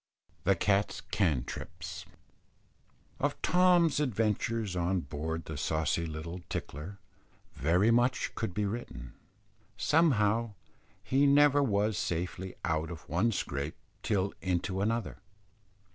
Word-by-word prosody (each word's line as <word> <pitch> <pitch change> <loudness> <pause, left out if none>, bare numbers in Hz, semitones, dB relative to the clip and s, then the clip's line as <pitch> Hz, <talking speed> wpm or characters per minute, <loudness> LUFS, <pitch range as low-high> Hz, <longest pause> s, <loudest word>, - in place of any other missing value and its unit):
THE 100 +1 +4
CAT'S 100 +3 +1
"CANTRIPS." 80 - -2 1.1
Of - - -1
Tom's 175 -4 +4
adventures 115 -5 0
on 90 +1 +1
board 80 +3 -4
the 80 - -6
saucy 80 +2 0
little 80 +3 -6
Tickler, 80 +8 -5 0.6
very 90 - +3
much 120 +1 +2
could 110 -3 -3
be 105 +3 -1
written. 100 - -5 0.6
Somehow, 115 -8 +2 0.5
he 140 +2 +3
never 145 0 +5
was 105 -5 +1
safely 90 +2 -3
out 80 -1 0
of 80 -4 -9
one 90 +9 +2
scrape 70 -6 -3 0.3
till 100 -2 0
into 95 +1 -1
another. 115 +3 -1
100 Hz, 110 wpm, -31 LUFS, 85-115 Hz, 1.1 s, never